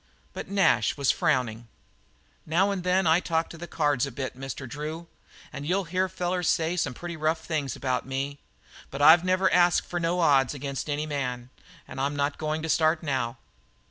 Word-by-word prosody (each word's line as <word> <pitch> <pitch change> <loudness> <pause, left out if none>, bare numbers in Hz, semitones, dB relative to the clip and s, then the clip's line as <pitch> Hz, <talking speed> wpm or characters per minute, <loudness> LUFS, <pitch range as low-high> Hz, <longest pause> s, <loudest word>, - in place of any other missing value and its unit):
But - - -6
Nash 195 -4 +2
was 140 -2 +3
frowning. 120 -5 0 0.8
"Now 185 +6 +2
and 190 -3 -3
then 180 +1 +2
I 160 +1 +5
talk 165 -2 -1
to 170 - -9
the 175 - -7
cards 145 -5 +1
a - - -7
bit, 130 +1 -5
Mr. 135 0 -6
Drew, 155 +6 -6 0.5
and 140 - -6
you'll 185 +6 0
hear 185 +2 -1
fellers 180 -1 -1
say 165 0 +1
some 145 -7 -1
pretty 175 +3 -6
rough 160 +1 0
things 145 -6 -2
about 130 -2 -1
me, 135 +2 -3 0.5
but 135 - -7
I've 160 +3 +8
never 185 +1 +2
asked 175 -1 +4
for 175 - -3
no 170 +1 0
odds 140 -4 +3
against 140 +1 -5
any 145 +1 -1
man. 125 -4 -4 0.4
I'm 140 +2 -2
not 140 0 -1
going 155 0 -2
to - - -2
start 155 +1 +2
now." 130 -5 -2
155 Hz, 185 wpm, -27 LUFS, 135-175 Hz, 0.8 s, I've